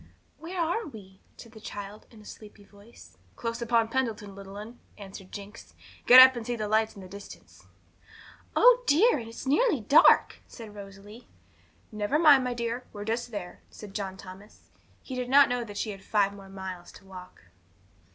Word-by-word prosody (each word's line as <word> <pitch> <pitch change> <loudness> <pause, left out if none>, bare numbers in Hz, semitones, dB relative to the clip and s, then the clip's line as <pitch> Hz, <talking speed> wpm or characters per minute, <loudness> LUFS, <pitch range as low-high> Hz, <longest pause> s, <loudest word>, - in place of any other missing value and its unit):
'Where 350 +3 -7
are 345 +7 -1
we?' 195 -7 -13 0.2
said 230 - -13
the 220 - -14
child, 205 0 -9
in 225 - -17
a - - -17
sleepy 210 -1 -13
voice. 205 +3 -18 0.2
'Close 230 0 -5
upon 230 -1 +1
Pendleton, 225 -5 -3
little 195 0 -11
'un,' 220 +4 -10 0.2
answered 195 -1 -12
Jinx. 195 - -11 0.3
'Get 250 +1 +10
up 260 0 +9
and 240 - -5
see 240 +1 -3
the 215 -2 -4
lights 220 +1 0
in 200 - -11
the - - -11
distance.' 200 +2 -14 0.9
'Oh - - +6
dear, 355 - +4
and 225 -1 -9
it's 230 - -10
nearly 305 - +2
dark!' 275 +8 +4
said 225 -4 -12
Rosalie. 200 +3 -13 0.6
'Never 210 +6 -1
mind, 295 -5 +6
my 250 -1 -3
dear; 235 +1 -4
we're 205 -1 -8
just 235 +2 -3
there,' 200 -6 -8
said 205 -2 -12
John 195 -2 -5
Thomas. 195 +2 -14 0.3
He 260 - -9
did 250 -1 -4
not 280 +1 +6
know 245 -1 -2
that 205 -3 -10
she 215 +1 -3
had 195 -1 -11
five 200 -2 0
more 195 -1 -13
miles 190 -2 -8
to - - -16
walk. 185 - -13
215 Hz, 185 wpm, -27 LUFS, 200-245 Hz, 0.9 s, Get